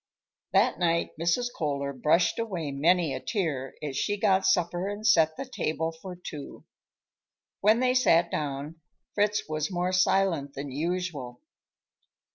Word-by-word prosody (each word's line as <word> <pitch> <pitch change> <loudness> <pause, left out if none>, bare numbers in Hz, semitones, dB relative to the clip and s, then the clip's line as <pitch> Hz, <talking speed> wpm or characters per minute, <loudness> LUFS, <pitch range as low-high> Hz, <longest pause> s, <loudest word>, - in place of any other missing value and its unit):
That - - +3
night 170 -1 +1
Mrs. 175 +9 +1
Kohler 140 -2 -2
brushed 155 - +2
away 180 -10 -3
many 160 +2 +2
a 130 - -3
tear 145 - -3
as 145 -3 -4
she 205 +8 0
got 195 -2 +2
supper 180 0 +1
and 205 +1 -6
set 160 -7 +4
the - - -4
table 160 -9 -2
for 180 +3 -9
two. 155 -5 -9 0.9
When 215 +4 +4
they 255 0 +3
sat 175 -10 +4
down, 145 +2 -4 0.3
Fritz 210 0 +1
was 155 -1 -2
more 180 -1 -1
silent 185 -6 +2
than 140 0 -5
usual. 150 -5 -3
170 Hz, 140 wpm, -27 LUFS, 150-190 Hz, 0.9 s, set